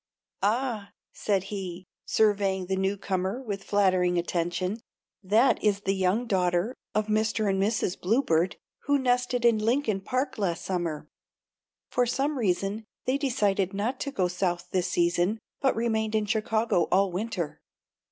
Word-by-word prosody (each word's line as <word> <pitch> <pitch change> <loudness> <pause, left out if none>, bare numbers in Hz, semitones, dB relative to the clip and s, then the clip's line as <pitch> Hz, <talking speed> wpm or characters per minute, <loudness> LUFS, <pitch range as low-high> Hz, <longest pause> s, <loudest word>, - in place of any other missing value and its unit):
"Ah," 220 0 -1 0.2
said 195 -3 0
he, 185 -2 -5 0.2
surveying 200 -3 +2
the 190 +1 -1
new 190 +1 0
comer 190 +3 -2
with 205 -7 -5
flattering 185 -3 +2
attention, 175 +4 -1 0.4
"that 215 +7 +3
is 205 -1 +2
the 195 -1 0
young 190 +5 +1
daughter 185 +1 +1 0.2
of 215 0 +2
Mr. 215 0 +1
and 195 -1 +1
Mrs. 205 -3 0
Bluebird 185 -5 +2 0.3
who 285 0 +4
nested 245 -2 +1
in 230 -2 +5
Lincoln 220 -2 +1
Park 255 +4 -2
last 175 -5 -1
summer. 170 -5 -2 0.8
For 245 -1 +2
some 275 +4 0
reason 195 +1 0 0.2
they 265 +2 +1
decided 205 -8 +1
not 230 +6 -1
to 280 - -3
go 185 -9 +1
South 175 -1 -2
this 185 -1 0
season 175 +4 +1 0.2
but 270 -2 +2
remained 220 -1 0
in 215 -1 +2
Chicago 220 -3 +1
all 195 0 +3
winter. 185 -4 -3
200 Hz, 145 wpm, -27 LUFS, 185-230 Hz, 0.8 s, in